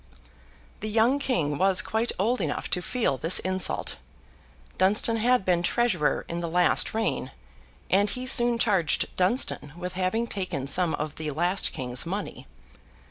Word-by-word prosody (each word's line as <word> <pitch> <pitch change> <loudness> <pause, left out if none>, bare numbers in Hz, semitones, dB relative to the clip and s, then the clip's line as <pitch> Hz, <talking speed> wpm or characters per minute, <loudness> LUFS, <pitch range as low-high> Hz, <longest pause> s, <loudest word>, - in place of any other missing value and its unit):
The 215 - -4
young 230 +6 +2
King 155 - -1
was 190 -1 +4
quite 225 +2 -1
old 225 +4 0
enough 155 -4 -3
to 180 - 0
feel 220 - -1
this 165 +3 +4
insult. 185 0 0 0.8
Dunstan 210 +4 +3
had 240 -2 +1
been 175 -2 +2
Treasurer 180 -6 0
in 170 - -4
the 170 -1 -4
last 180 +5 +1
reign, 220 -11 -2 0.6
and 200 +2 +2
he 250 +4 -5
soon 240 -2 +5
charged 195 -9 0
Dunstan 185 - 0
with 180 +1 -5
having 185 +5 -1
taken 185 - -4
some 165 +4 +1
of 150 0 -6
the 155 -1 -4
last 175 +6 0
king's 125 -1 -3
money. 200 +4 -6
185 Hz, 150 wpm, -26 LUFS, 170-225 Hz, 0.8 s, soon